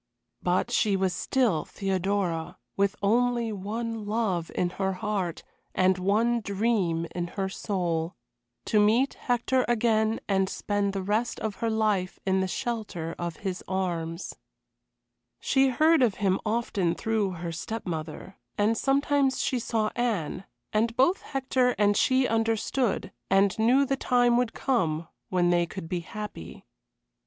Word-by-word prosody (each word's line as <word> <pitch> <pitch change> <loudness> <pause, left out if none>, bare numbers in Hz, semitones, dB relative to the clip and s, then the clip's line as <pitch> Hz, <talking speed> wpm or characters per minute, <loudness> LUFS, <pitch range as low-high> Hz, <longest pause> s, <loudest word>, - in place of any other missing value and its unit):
But 180 +7 +1
she 210 -4 +2
was 190 -1 +1
still 220 - +1
Theodora, 190 -3 -2 0.2
with 200 +1 +1
only 235 +2 +2
one 215 +2 -4
love 205 -6 -1
in 175 -1 0
her 190 0 +1
heart 185 -3 -3 0.3
and 185 0 +3
one 220 +6 +2
dream 200 -5 0
in 175 -1 -2
her 195 -1 0
soul 175 -4 -2 0.5
to 215 - +3
meet 225 +6 +3
Hector 250 +1 0
again 220 -2 +2
and 195 -1 +2
spend 205 -1 -1
the 195 -1 -3
rest 215 +5 -1
of 215 -2 -3
her 230 - -1
life 215 -4 0
in 190 0 +2
the 190 - 0
shelter 185 -5 -3
of 170 -1 -3
his 185 -1 -3
arms. 175 -2 -2 1.1
She 270 0 +3
heard 310 +4 +4
of 230 -6 +3
him 195 -2 +1
often 210 -6 0
through 220 -4 0
her 170 -1 -5
step 220 +7 -5
mother; 160 -6 -6 0.2
and 210 +2 +2
sometimes 275 +1 +2
she 255 - 0
saw 220 -2 -1
Anne 200 -7 -1 0.3
and 230 +2 +1
both 305 +9 +3
Hector 255 -2 0
and 205 -1 +3
she 260 +1 +3
understood, 225 +1 0 0.2
and 195 0 +4
knew 250 +5 +4
the 275 0 -1
time 245 -2 +3
would 245 -2 0
come 170 - 0 0.2
when 175 -1 +2
they 175 -1 +2
could 185 -1 -7
be 180 +1 -2
happy. 210 - -8
210 Hz, 145 wpm, -27 LUFS, 185-235 Hz, 1.1 s, heard